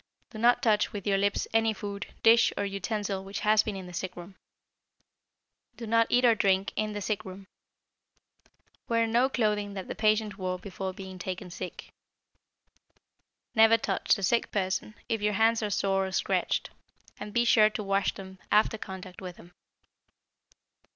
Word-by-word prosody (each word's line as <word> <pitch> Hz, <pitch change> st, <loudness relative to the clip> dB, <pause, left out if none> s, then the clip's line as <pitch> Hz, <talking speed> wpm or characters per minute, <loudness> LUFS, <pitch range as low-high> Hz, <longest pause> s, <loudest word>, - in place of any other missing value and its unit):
Do 215 Hz, -, -8 dB
not 240 Hz, +4 st, +4 dB
touch 215 Hz, -3 st, +2 dB
with 200 Hz, -2 st, -6 dB
your 195 Hz, -1 st, +2 dB
lips 200 Hz, 0 st, 0 dB
any 225 Hz, 0 st, +3 dB
food, 200 Hz, 0 st, -6 dB, 0.2 s
dish, 230 Hz, +1 st, +6 dB
or -, -, 0 dB
utensil 200 Hz, 0 st, -3 dB
which 195 Hz, +1 st, -6 dB
has 215 Hz, 0 st, +4 dB
been 215 Hz, -1 st, -4 dB
in 190 Hz, -1 st, -7 dB
the 180 Hz, -, -10 dB
sick 185 Hz, +2 st, -4 dB
room. 175 Hz, +2 st, -10 dB, 1.4 s
Do 235 Hz, -, -6 dB
not 230 Hz, +1 st, +3 dB
eat 245 Hz, +1 st, +3 dB
or 235 Hz, -, +6 dB
drink 195 Hz, -3 st, +1 dB
in 215 Hz, 0 st, -2 dB
the 205 Hz, -, -4 dB
sick 215 Hz, +1 st, -2 dB
room. 190 Hz, -1 st, -10 dB, 1.4 s
Wear 230 Hz, -1 st, +2 dB
no 240 Hz, +4 st, +2 dB
clothing 210 Hz, -5 st, -1 dB
that 190 Hz, -2 st, -6 dB
the -, -, -4 dB
patient 215 Hz, -2 st, +1 dB
wore 185 Hz, -1 st, -2 dB
before 190 Hz, 0 st, -5 dB
being 190 Hz, 0 st, -9 dB
taken 180 Hz, 0 st, -5 dB
sick. 180 Hz, +1 st, -8 dB, 1.6 s
Never 225 Hz, 0 st, +6 dB
touch -, -, +1 dB
the 200 Hz, -, -6 dB
sick 235 Hz, +5 st, +1 dB
person 190 Hz, +1 st, -2 dB
if 225 Hz, -2 st, -1 dB
your 210 Hz, 0 st, +1 dB
hands 225 Hz, +3 st, +3 dB
are 210 Hz, -, -1 dB
sore 195 Hz, -1 st, 0 dB
or -, -, -6 dB
scratched, -, -, -1 dB, 0.5 s
and 210 Hz, 0 st, -7 dB
be 240 Hz, +2 st, +2 dB
sure 215 Hz, -2 st, +6 dB
to 215 Hz, 0 st, -5 dB
wash 195 Hz, 0 st, +1 dB
them 190 Hz, -1 st, -10 dB
after 215 Hz, +1 st, +3 dB
contact 190 Hz, -1 st, -9 dB
with 180 Hz, -2 st, -8 dB
him. 175 Hz, -, -15 dB
205 Hz, 170 wpm, -28 LUFS, 190-220 Hz, 1.6 s, dish